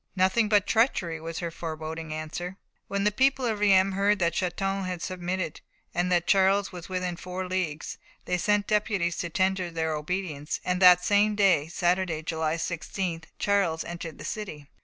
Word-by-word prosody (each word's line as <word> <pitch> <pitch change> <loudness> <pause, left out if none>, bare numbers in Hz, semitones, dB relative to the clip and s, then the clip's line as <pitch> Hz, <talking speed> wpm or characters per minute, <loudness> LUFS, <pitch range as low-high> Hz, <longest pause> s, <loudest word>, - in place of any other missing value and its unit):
"Nothing 190 +4 +3
but 205 -1 +4
treachery," 185 - +1
was 165 0 -5
her 170 -1 -3
foreboding 160 -1 -6
answer. 160 +4 -5 0.3
When 200 0 -1
the 210 - +3
people 265 +3 +2
of 220 -3 -1
Reims 195 -2 +4
heard 200 +2 +2
that 170 -3 +1
Châlons 195 +2 -1
had 180 -1 -3
submitted, 180 -1 -3 0.3
and 175 +1 0
that 175 -1 +2
Charles 195 0 +3
was 175 -1 -9
within 180 -1 -2
four 180 +2 -5
leagues, 180 -5 -3 0.3
they 180 0 0
sent 205 +2 +2
deputies 200 -5 0
to 170 - -2
tender 185 +1 0
their 160 -1 -1
obedience, 150 -1 -3
and 180 +1 0
that 180 -1 +7
same 210 +1 +3
day, 185 -8 +3
Saturday, 175 -1 0
July 160 -1 -1
16th, 170 0 -3
Charles 195 -6 +1
entered 170 -2 -7
the - - -9
city. 155 -10 -6
180 Hz, 170 wpm, -27 LUFS, 165-195 Hz, 0.3 s, that